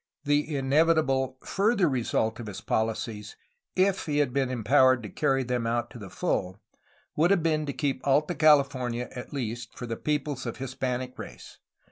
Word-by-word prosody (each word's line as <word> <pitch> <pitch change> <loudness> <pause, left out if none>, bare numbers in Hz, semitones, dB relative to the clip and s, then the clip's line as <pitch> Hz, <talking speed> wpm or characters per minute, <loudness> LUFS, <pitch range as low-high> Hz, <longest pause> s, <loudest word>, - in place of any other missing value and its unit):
The 145 +1 +1
inevitable 135 -2 +2
further 200 -2 +2
result 115 -4 0
of 115 - -7
his 105 - -6
policies, 110 -1 -2 0.4
if 190 0 +1
he 145 -1 0
had 145 -4 +1
been 135 -2 +1
empowered 130 +1 +3
to 105 - -6
carry 135 +5 +1
them 125 -2 -1
out 120 +1 -1
to 120 - -10
the 100 -3 -9
full, 95 +2 -2 0.6
would 165 +3 +3
have 195 -5 +3
been 155 -2 +1
to - - -1
keep 140 -2 -2
Alta 145 +4 +2
California 135 -6 +3
at 125 - -7
least 120 -4 -5
for 125 - -5
the 115 -1 -4
peoples 145 -3 -2
of 115 - -5
Hispanic 130 -1 -4
race. - - -10
130 Hz, 170 wpm, -27 LUFS, 120-150 Hz, 0.6 s, empowered